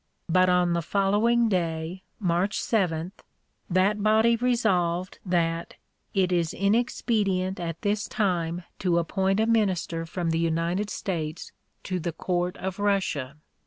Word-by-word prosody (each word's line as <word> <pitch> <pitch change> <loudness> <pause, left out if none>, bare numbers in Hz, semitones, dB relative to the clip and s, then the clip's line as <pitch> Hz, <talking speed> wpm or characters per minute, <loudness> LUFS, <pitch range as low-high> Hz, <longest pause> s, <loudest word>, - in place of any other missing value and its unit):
But 185 +2 +4
on 180 -1 +3
the 170 - +1
following 205 +7 +2
day, 170 -2 -2 0.2
March 185 +1 0
7, 180 -5 0 0.6
that 195 +3 +2
body 220 +2 +4
resolved 190 -8 0
that 170 -2 -1 0.4
"it 185 -2 +2
is 170 -3 0
inexpedient 200 -3 +1
at 165 -1 -5
this 205 0 0
time 175 -4 -1 0.2
to 175 -3 +1
appoint 190 +3 +1
a 220 - +3
minister 190 -7 0
from 170 -1 -2
the 165 - 0
United 170 +5 0
States 160 -7 -4 0.3
to 185 -2 -2
the 170 0 -3
Court 175 +2 -2
of 190 +1 -5
Russia." 185 -9 0
185 Hz, 130 wpm, -26 LUFS, 170-205 Hz, 0.6 s, But